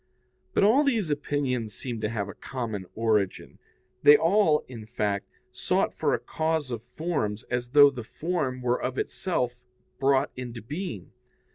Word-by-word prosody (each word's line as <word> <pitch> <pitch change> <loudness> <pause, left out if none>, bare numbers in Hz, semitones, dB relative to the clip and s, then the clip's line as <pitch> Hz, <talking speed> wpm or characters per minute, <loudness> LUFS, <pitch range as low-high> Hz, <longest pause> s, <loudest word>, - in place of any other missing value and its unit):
But - - +4
all 235 +8 +5
these 225 - +1
opinions 130 -7 -1
seem 120 -4 -5
to 110 - 0
have 105 -3 -2
a 100 - -7
common 110 -7 -5
origin; 110 -4 0 0.4
they 145 0 +9
all, 165 -3 +3
in 115 -4 -9
fact, 105 -4 -2 0.2
sought - - 0
for - - +1
a - - -4
cause 160 -4 -1
of 115 -2 -3
forms 120 -7 -3
as 120 0 -1
though 145 +1 +7
the 125 -4 -6
form 135 -2 -3
were 125 0 +1
of 130 0 -3
itself 125 -9 -2 0.4
brought 135 -1 +3
into 120 -3 -7
being. 145 - -6
125 Hz, 155 wpm, -27 LUFS, 115-150 Hz, 0.4 s, they